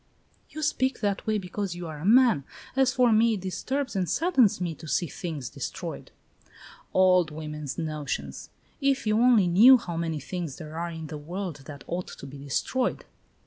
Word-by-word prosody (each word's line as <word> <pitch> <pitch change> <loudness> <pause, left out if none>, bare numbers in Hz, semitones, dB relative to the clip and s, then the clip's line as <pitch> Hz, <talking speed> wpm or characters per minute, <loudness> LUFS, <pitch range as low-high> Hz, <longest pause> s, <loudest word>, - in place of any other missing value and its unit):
"You 310 - -6
speak 265 -3 0
that 205 -1 -1
way 215 -1 +2
because 190 -1 -4
you 175 0 -6
are 155 -2 -7
a 155 - -6
man. 230 - +5 0.3
As 265 -1 +3
for 250 -2 +3
me, 225 +1 +4
it 195 - -6
disturbs 255 +9 -3
and 185 -3 0
saddens 275 - +3
me 175 -2 -2
to 160 +1 -11
see 175 - +1
things 155 -5 -5
destroyed." - - -6 0.8
"Old 185 -3 +4
women's 150 -2 -6
notions. 145 - -4 0.3
If 275 -2 +1
you 215 0 +2
only 240 -5 +5
knew 220 +10 +8
how 175 -7 -6
many 165 -2 -2
things 165 -1 -5
there 155 -1 -9
are 170 +1 -3
in 160 -1 -7
the 150 0 -7
world 175 +2 -5
that 140 -3 -9
ought 180 +1 -4
to - - -10
be 140 +1 -10
destroyed!" 145 - -1
180 Hz, 185 wpm, -27 LUFS, 155-225 Hz, 0.8 s, knew